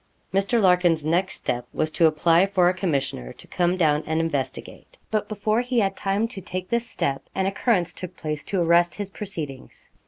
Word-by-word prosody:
Mr. 200 +5 +2
Larkin's 180 -5 +3
next 180 +4 +1
step 120 0 -3
was 155 0 -1
to 165 +1 +4
apply 165 +4 +3
for 185 -3 +3
a 180 - +3
commissioner 140 - -2
to - - -14
come 175 +1 0
down 155 -4 +2
and 160 0 0
investigate. 145 -5 -4
But 215 -1 -1
before 215 +2 0
he 250 0 -2
had 195 -3 +2
time 200 +4 0
to 215 -5 -5
take 185 -1 -5
this 235 0 0
step, 135 -9 -2
an 190 - 0
occurrence 195 -2 +1
took 185 -1 -7
place 150 -1 -3
to 195 - -1
arrest 170 +1 +4
his 205 -1 -4
proceedings. 160 -11 -4
180 Hz, 190 wpm, -24 LUFS, 160-195 Hz, -, to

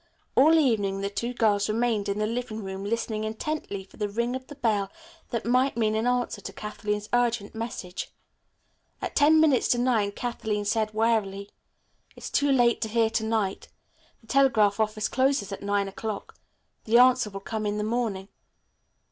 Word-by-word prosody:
All 310 +5 +6
evening 205 -9 +1
the 200 0 -2
two 235 +4 -3
girls 215 -4 +1
remained 220 -2 0
in 200 - -1
the 210 - 0
living 225 -1 -4
room 190 0 -5
listening 215 0 -2
intently 220 -2 -4
for 190 - -20
the 210 -1 -2
ring 235 +4 -1
of 260 0 -7
the 290 - -10
bell 210 -7 0 0.4
that 235 -2 -3
might 255 +1 +2
mean 215 -2 +2
an 220 +2 0
answer 245 0 0
to - - -7
Kathleen's 210 0 -4
urgent 240 -4 +1
message. 225 -5 -5 0.9
At - - -5
ten 310 +2 +5
minutes 295 -6 +4
to 245 - +2
nine 235 -5 +1
Kathleen 215 -2 -3
said 215 0 0
wearily. 210 -3 0 0.6
"It's - - -8
too 285 0 +2
late 245 -3 +3
to 220 - -2
hear 225 0 +2
to 220 - 0
night. 220 -3 -1 0.5
The - - -22
telegraph 220 -6 +3
office 215 0 0
closes 260 -6 +1
at 195 - -6
nine 200 0 0
o'clock. 210 +2 -6 0.5
The 225 +2 +4
answer 250 -2 +5
will 195 -1 -7
come 215 +1 -3
in 205 0 -1
the 210 - -1
morning. 215 -4 -2
220 Hz, 175 wpm, -26 LUFS, 205-245 Hz, 0.9 s, All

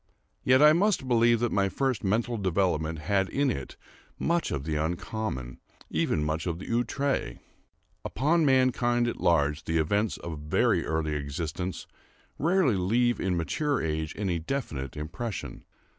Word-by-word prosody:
Yet 130 +3 +5
I 150 0 +8
must 185 -5 +1
believe 120 -1 +4
that 120 - +1
my 100 -1 +2
first 130 0 -1
mental 115 +5 0
development 90 -5 0
had 95 +1 +1
in 140 -1 +1
it 70 - -6 0.4
much 170 0 0
of 70 - -3
the 80 +1 -2
uncommon—even 80 - -3
much 80 +3 -2
of 85 -1 -2
the 95 - -8
outré. 120 - -1 0.7
Upon 160 +7 +1
mankind 125 -3 +3
at 120 - -4
large 80 -3 +2
the 80 - 0
events 100 +7 +1
of 80 -3 -6
very 75 +1 +1
early 80 -1 -1
existence 75 +5 -4 0.5
rarely 165 - +3
leave 120 +6 +1
in 90 -2 0
mature 140 - 0
age 80 -1 -2
any 95 -5 -1
definite 80 - -4
impression. 80 - -5
95 Hz, 145 wpm, -28 LUFS, 80-125 Hz, 0.7 s, I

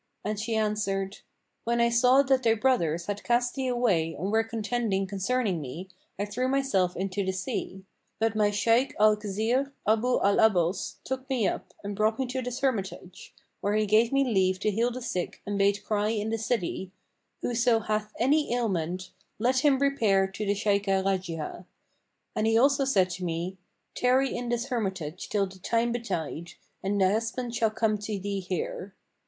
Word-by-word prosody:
and 210 0 -2
she 225 +1 -2
answered, 210 -2 -1 0.4
"When 235 +1 0
I 235 0 +4
saw 250 +3 +5
that 265 -1 +2
thy 225 -2 +3
brothers 175 -9 +1
had 205 0 -4
cast 240 0 +1
thee 265 -1 -2
away 200 -10 +1
and 190 +6 -3
were 225 +1 +3
contending 225 -2 -1
concerning 200 -1 -1
me, 160 +8 -7 0.3
I 200 - -1
threw 245 +5 -2
myself 260 -10 +1
into 195 +1 -2
the 190 - 0
sea; 190 0 -4 0.3
but 225 -1 0
my 210 -1 +3
Shaykh 230 +6 +2
Al 215 0 +6
Khizr 220 +7 -1 0.2
Abu 225 +4 +3
al 200 0 +3
'Abbбs 185 -4 +2
took 265 +1 -5
me 245 -6 +1
up - - -4
and 200 0 -4
brought 215 +2 +1
me 265 - 0
to 255 +1 -3
this 250 +1 -5
hermitage, 195 -8 -3 0.2
where 205 +1 0
he 215 0 +2
gave 220 +3 +3
me 275 0 +3
leave 190 -6 +1
to 215 - +1
heal 230 +4 +1
the 250 +1 -6
sick 180 -7 -3
and 200 0 -2
bade 200 +1 +2
cry 210 -1 0
in 215 0 -1
the 225 - -1
city, 205 -4 -2 0.5
'Whoso 240 -1 +2
hath 215 0 -2
any 285 +3 +2
ailment, 185 -6 -2 0.3
let 250 +4 +2
him 280 -1 +4
repair 230 -9 +3
to 195 +2 -5
the 200 - +2
Shaykhah 200 -2 +1
Rajihah;' 180 -3 -3 0.7
and 215 - +1
he 225 0 +4
also 275 +2 +4
said 190 -9 +2
to 180 +1 -5
me, 175 +2 -3 0.3
'Tarry 260 +1 +2
in 240 0 -3
this 240 +2 -1
hermitage 190 - -3
till 200 -2 +1
the 190 0 -12
time 230 +5 +1
betide, 170 -8 -4 0.3
and 200 +1 -1
thy 190 -1 +4
husband 230 +3 -2
shall 225 -1 +2
come 215 -1 0
to 210 0 -3
thee 200 +1 -3
here.' 185 +1 -4
215 Hz, 180 wpm, -28 LUFS, 195-240 Hz, 0.7 s, Al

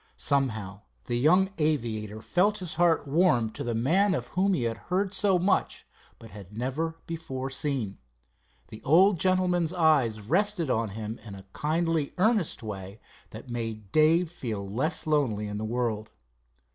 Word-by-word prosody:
Somehow 110 -9 -1 0.2
the 120 - -2
young 180 +10 +4
aviator 110 -8 -1
felt 200 +4 +2
his 180 -5 -4
heart 165 -2 +2
warm 135 -8 +3
to - - -6
the 120 -1 -2
man 180 - +2
of - - -4
whom 190 +1 +1
he 125 - -1
had 115 -2 -1
heard 190 +2 0
so 195 -1 +3
much, 185 +3 0 0.3
but 115 - -13
had 100 0 -11
never 150 +7 -2
before 135 -5 -5
seen. 130 -8 -2 0.7
The 110 - -10
old 180 +5 +4
gentleman's 180 -2 +1
eyes 150 -11 +3
rested 170 - 0
on 115 -2 0
him 110 +1 -5
in 105 -3 -9
a 95 -1 -12
kindly 160 -1 0
earnest 200 - +1
way 100 -1 -7 0.3
that 120 +3 -10
made 110 -4 -5
Dave 160 +2 +4
feel 110 - -5
less 135 - -2
lonely 135 -9 +1
in 105 0 -4
the - - -4
world. 110 -2 -2
140 Hz, 160 wpm, -27 LUFS, 110-175 Hz, 0.7 s, young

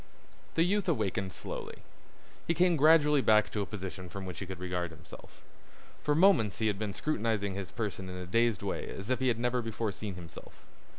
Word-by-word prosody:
The 165 - +4
youth 195 +1 +1
awakened 100 - 0
slowly. - - -6 0.7
He 170 - +2
came 175 +1 +4
gradually 150 -1 +5
back 110 -3 +4
to 105 - -1
a 100 - -3
position 95 -3 -6
from 95 +1 -6
which 90 -3 -6
he 95 - -5
could 95 -1 -6
regard 90 -1 -2
himself. 80 +2 -14 0.6
For 150 - +1
moments 160 - +4
he 110 - -1
had 105 -2 +1
been 105 -2 -3
scrutinizing 110 -8 0
his 95 -2 -5
person 100 -4 -4
in 90 - -6
a 90 - -5
dazed 115 +3 +1
way - - -3
as 100 +6 -5
if 130 - +1
he 130 - +1
had 120 -3 +2
never 120 +1 0
before 115 -1 -2
seen 100 -1 -6
himself. 85 -2 -12
105 Hz, 200 wpm, -31 LUFS, 95-130 Hz, 0.7 s, gradually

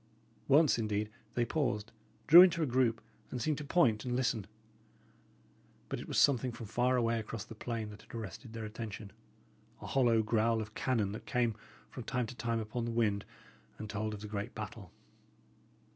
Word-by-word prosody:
Once, 145 -2 +5
indeed, 105 -1 -1 0.2
they 120 - +2
paused, 115 -7 -1 0.3
drew 170 +3 +11
into 175 -3 +5
a - - +2
group, 120 -3 +1 0.3
and 125 - -4
seemed 150 +4 0
to - - -5
point 140 -8 +3
and 125 -1 -2
listen. 120 -5 0 1.4
But - - -3
it - - -8
was - - -2
something 130 -2 +4
from 115 - -8
far 125 +4 +1
away 115 -1 +1
across 110 0 -6
the 115 - -10
plain 110 -1 -4
that 105 - -12
had - - -13
arrested 110 +2 -7
their 115 -1 -5
attention 105 -2 -7 0.7
a - - -9
hollow 120 -4 +3
growl 115 +1 +2
of 110 0 -6
cannon 110 -6 0
that 110 +2 -8
came, 120 -3 +1 0.4
from 125 - -7
time 125 +1 -1
to 125 - -8
time, 115 -1 -1
upon 110 +2 -3
the - - -2
wind, 105 -3 +1 0.5
and 110 - -6
told 110 +1 -3
of 105 - -10
the 105 - -6
great 100 -1 -5
battle. - - -7
115 Hz, 185 wpm, -33 LUFS, 110-125 Hz, 1.4 s, drew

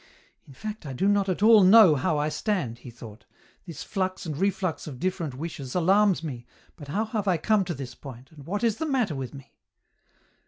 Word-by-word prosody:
" - - -38
In 140 - -14
fact 215 +7 -7
I 135 - -5
do 165 +10 0
not 200 -1 +2
at 185 +2 -1
all 220 -2 +7
know 190 -2 +8
how 150 +3 0
I 145 +1 0
stand," 150 - -2
he 125 - -11
thought; 115 -1 -12 0.2
" - - -33
this 165 - -7
flux 185 -2 -3
and 155 -3 -4
reflux 190 -1 -2
of 135 -5 -8
different 170 -6 -3
wishes 140 -3 -7
alarms 190 +1 +3
me, 125 -6 -7 0.3
but 145 -4 -11
how 205 +10 -1
have 215 -2 -3
I 180 -3 +3
come 210 +5 +2
to 175 -2 -4
this 130 -2 -7
point, 130 -1 -12
and 150 -3 -14
what 205 +5 -3
is 230 -3 +1
the 320 - -3
matter 250 - 0
with 135 -1 -6
me 135 -1 -13
175 Hz, 225 wpm, -26 LUFS, 140-200 Hz, 0.3 s, know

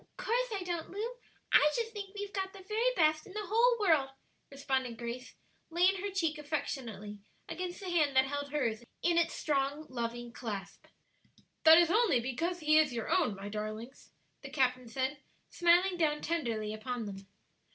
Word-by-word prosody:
"'Course - - 0
I 395 -3 -2
don't, 345 -2 -3
Lu; 435 +6 -4 0.4
I 300 - +7
just 460 -1 -1
think 405 -1 -7
we've 410 0 -5
got 385 -1 -3
the 390 -1 -11
very 455 +4 +2
best 310 -3 +2
in 380 - -12
the 425 0 -4
whole 470 +4 +4
world," 320 -9 +3 0.4
responded 265 -4 -2
Grace, 240 +1 -6 0.3
laying 360 +3 +3
her 405 - -2
cheek 330 -5 -1
affectionately 235 -9 -4 0.3
against 360 -1 -5
the 375 - -5
hand 300 -5 +2
that 260 0 +6
held 285 +1 -3
hers 240 -6 -1 0.2
in 340 -1 +4
its 335 - 0
strong, 285 +1 -1
loving 240 -1 -4
clasp. 200 -6 -6 0.8
"That 320 0 +10
is 340 -1 +5
only 430 - +4
because 325 +9 -2
he 310 0 +5
is 300 -5 +2
your 230 -2 -3
own, 205 - +2
my 195 +1 -7
darlings," 215 +4 -6 0.3
the - - -8
captain 255 -3 +1
said, 260 +4 -2 0.3
smiling 350 +1 +4
down 300 -3 +1
tenderly 230 -10 -2
upon 230 +1 -4
them. 195 -1 -8
300 Hz, 170 wpm, -32 LUFS, 245-360 Hz, 0.8 s, That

